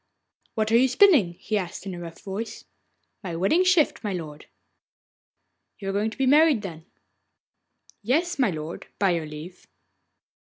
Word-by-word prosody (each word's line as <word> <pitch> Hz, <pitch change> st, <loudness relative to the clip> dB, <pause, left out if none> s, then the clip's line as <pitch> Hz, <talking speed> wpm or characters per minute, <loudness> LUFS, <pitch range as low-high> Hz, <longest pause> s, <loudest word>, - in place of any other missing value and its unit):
'What 220 Hz, 0 st, 0 dB
are 230 Hz, -, +6 dB
you 260 Hz, +2 st, +5 dB
spinning?' 260 Hz, -, +5 dB
he 210 Hz, +4 st, -2 dB
asked 180 Hz, 0 st, -6 dB
in 195 Hz, -, -5 dB
a 175 Hz, -, -7 dB
rough 165 Hz, -1 st, -9 dB
voice. 205 Hz, +3 st, -6 dB, 0.6 s
'My 175 Hz, -3 st, -4 dB
wedding 195 Hz, -, +2 dB
shift, 365 Hz, -9 st, +2 dB
my 205 Hz, -2 st, -2 dB
lord.' 155 Hz, -4 st, -7 dB, 1.3 s
'You 195 Hz, -2 st, -5 dB
are -, -, -2 dB
going 210 Hz, +2 st, 0 dB
to 220 Hz, -, -12 dB
be 270 Hz, -, +1 dB
married, 290 Hz, -3 st, +4 dB
then?' 165 Hz, -4 st, -8 dB, 1.1 s
'Yes, 305 Hz, -, 0 dB
my 250 Hz, -5 st, +3 dB
lord, 160 Hz, -1 st, -6 dB
by 195 Hz, -2 st, +2 dB
your 165 Hz, -3 st, -2 dB
leave. 155 Hz, +4 st, -10 dB
200 Hz, 160 wpm, -25 LUFS, 175-260 Hz, 1.3 s, are